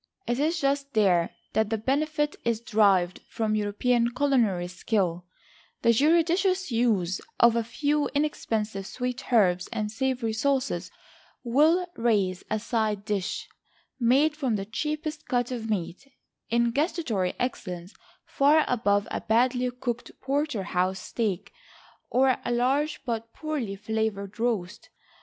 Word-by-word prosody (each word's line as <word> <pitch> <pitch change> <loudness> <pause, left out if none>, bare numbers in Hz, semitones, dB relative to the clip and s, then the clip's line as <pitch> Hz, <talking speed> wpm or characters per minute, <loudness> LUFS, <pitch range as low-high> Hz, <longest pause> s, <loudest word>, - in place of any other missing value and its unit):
It 240 +2 -1
is 320 +3 +1
just 275 -1 -1
there 180 -6 +3 0.2
that 220 0 0
benefit 295 +2 0
is 230 -2 0
derived 200 -6 +2
from 220 -2 -1
European 230 +3 +1
culinary 235 -11 +2
skill; 180 -2 -1 0.6
the 235 - +5
judicious 340 - +2
use 215 -7 +1 0.2
of 235 -1 +6
a 235 - +1
few 290 +6 0
inexpensive 220 -9 -1
sweet 250 0 -4
herbs, 185 -6 +3
and 210 -1 -2
savory 250 -1 -1
sauces, 270 +3 0 0.5
will 305 +9 +3
raise 205 -6 +1
a 215 - +1
side 215 -2 -1
dish, 205 -4 -2 0.5
made 270 +6 +3
from 265 -7 0
the 195 -1 -3
cheapest 305 - -4
cut 245 -1 0
of 225 -3 -4
meat, 205 +6 -3 0.4
in 235 0 +2
gustatory 265 - -1
excellence 180 -7 -4 0.3
far 300 +2 +4
above 205 -4 +1
a - - -2
badly 250 +2 +2
cooked 245 -1 -4
porterhouse 210 - -1
steak, 205 -2 -3 0.6
or 260 0 +3
a - - -2
large 270 +5 +1
but 230 -1 -3
poorly 290 -10 -3
flavored 210 -1 -3
roast. 210 -6 -2
235 Hz, 125 wpm, -27 LUFS, 205-275 Hz, 0.6 s, of